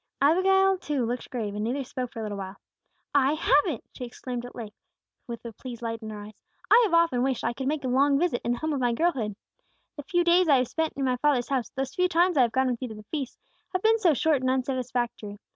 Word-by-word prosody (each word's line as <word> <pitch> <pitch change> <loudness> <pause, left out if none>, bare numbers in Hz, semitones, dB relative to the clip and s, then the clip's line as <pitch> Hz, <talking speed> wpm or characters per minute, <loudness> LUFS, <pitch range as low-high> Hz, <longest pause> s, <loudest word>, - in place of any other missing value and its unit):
Abigail, 380 +5 +4
too, 290 -8 -1
looked 245 +1 -4
grave, 220 -5 -3
and 210 +1 -3
neither 260 +5 -1
spoke 255 -1 -5
for 225 - -6
a - - -4
little 205 -2 -4
while. 190 0 -6 0.6
"I 280 0 +4
have 295 -2 +3
it!" 305 - -3
she - - -8
exclaimed 245 0 -6
at 245 - -11
length, 220 -2 -8 0.5
with 235 0 -7
a 230 - -6
pleased 240 +1 -9
light 230 0 -3
in 220 - -7
her 210 -1 -7
eyes. 210 0 -13 0.3
"I 475 - +8
have 395 - -2
often 335 -7 +3
wished 260 -1 0
I - - 0
could 265 +2 -4
make 295 0 -1
a - - -2
long 275 +3 +3
visit 320 -5 0
in 240 - 0
the - - -3
home 315 +4 -2
of 280 - -1
my 245 -2 +1
girlhood. 240 - 0 0.6
The - - -4
few 350 +3 +1
days 350 +1 +4
I 280 - +6
have 250 -1 0
spent 320 -1 -1
in 275 - -1
my 255 -1 +1
father's 260 -2 +1
house, 260 -5 -1
those 270 0 -4
few 365 0 +2
times 355 +1 +2
I 275 - +5
have 235 -2 +3
gone 260 +2 +1
with 240 - -4
you 255 - -3
to 220 - -8
the 210 - -11
feasts, 280 -5 -4 0.4
have 370 - -1
been 450 +1 +4
so 345 -8 +4
short 295 0 +2
and 255 - 0
unsatisfactory. 250 -5 -2
260 Hz, 260 wpm, -26 LUFS, 235-310 Hz, 0.6 s, I